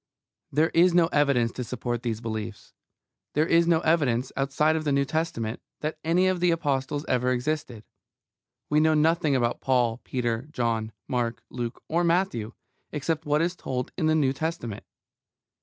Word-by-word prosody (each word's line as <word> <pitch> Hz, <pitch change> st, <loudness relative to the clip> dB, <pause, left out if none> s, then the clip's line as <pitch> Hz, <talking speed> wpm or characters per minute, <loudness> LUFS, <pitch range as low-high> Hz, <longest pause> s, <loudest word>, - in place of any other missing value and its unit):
There 155 Hz, +4 st, +3 dB
is 175 Hz, +1 st, +4 dB
no 170 Hz, -2 st, +5 dB
evidence 140 Hz, -7 st, +2 dB
to 125 Hz, -, -5 dB
support 120 Hz, 0 st, -3 dB
these 115 Hz, -3 st, -3 dB
beliefs. 110 Hz, -2 st, -6 dB, 0.6 s
There 150 Hz, +2 st, +3 dB
is 170 Hz, 0 st, +4 dB
no 165 Hz, -2 st, +3 dB
evidence, 135 Hz, -7 st, +1 dB
outside 140 Hz, +3 st, +2 dB
the 155 Hz, -2 st, -1 dB
New 140 Hz, 0 st, +2 dB
Testament, 135 Hz, -8 st, -2 dB, 0.2 s
that 155 Hz, +1 st, -3 dB
any 170 Hz, +3 st, +3 dB
of 185 Hz, -1 st, +1 dB
the 180 Hz, 0 st, +3 dB
Apostles 145 Hz, -3 st, -1 dB
ever 125 Hz, 0 st, +1 dB
existed. 125 Hz, -3 st, -2 dB, 0.8 s
We 150 Hz, -, +3 dB
know 155 Hz, 0 st, +4 dB
nothing 155 Hz, -1 st, +3 dB
about 120 Hz, -2 st, 0 dB
Paul, 125 Hz, -3 st, +1 dB
Peter, 120 Hz, 0 st, -2 dB
John, 115 Hz, -4 st, -1 dB, 0.2 s
Mark, 120 Hz, -2 st, -2 dB
Luke, 120 Hz, -1 st, -5 dB
or 170 Hz, +2 st, +1 dB
Matthew, 170 Hz, -, 0 dB, 0.4 s
except 155 Hz, +1 st, -2 dB
what 150 Hz, +2 st, +3 dB
is 175 Hz, +1 st, -1 dB
told 125 Hz, -7 st, -4 dB
in 160 Hz, -4 st, 0 dB
the 155 Hz, -, +3 dB
New 140 Hz, -4 st, +2 dB
Testament. 140 Hz, -8 st, -4 dB
140 Hz, 160 wpm, -26 LUFS, 120-160 Hz, 0.8 s, no